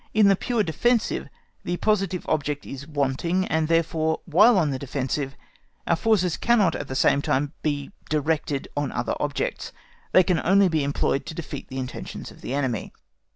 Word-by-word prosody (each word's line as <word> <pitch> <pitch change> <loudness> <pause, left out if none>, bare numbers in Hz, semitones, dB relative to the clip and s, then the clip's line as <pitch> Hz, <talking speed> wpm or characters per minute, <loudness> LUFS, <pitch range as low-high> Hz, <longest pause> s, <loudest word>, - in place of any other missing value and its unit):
In 210 -2 +6
the 195 - +5
pure 235 +2 0
defensive 230 +9 0 0.3
the 175 - -2
positive 195 -4 0
object 145 -1 -1
is 140 +1 -8
wanting, 155 +5 0
and 160 -2 0
therefore, 165 -1 +1
while 200 +7 +6
on 155 -5 +2
the 130 - -3
defensive, 135 0 -3 0.5
our 170 - +3
forces 185 -3 +2
cannot 215 -8 +3
at 145 - -5
the 130 - -5
same 140 +1 +3
time 145 +2 0
be 145 0 -2 0.2
directed 150 -2 0
on 145 -1 -1
other - - -2
objects; - - -2 0.4
they 185 - +6
can 180 -2 +1
only 195 +1 +5
be 160 -3 +1
employed 140 0 0
to 160 - -6
defeat 155 -4 -6
the 130 - -7
intentions 130 -1 -6
of - - -16
the - - -6
enemy. 130 -7 -2
160 Hz, 175 wpm, -25 LUFS, 140-185 Hz, 0.5 s, In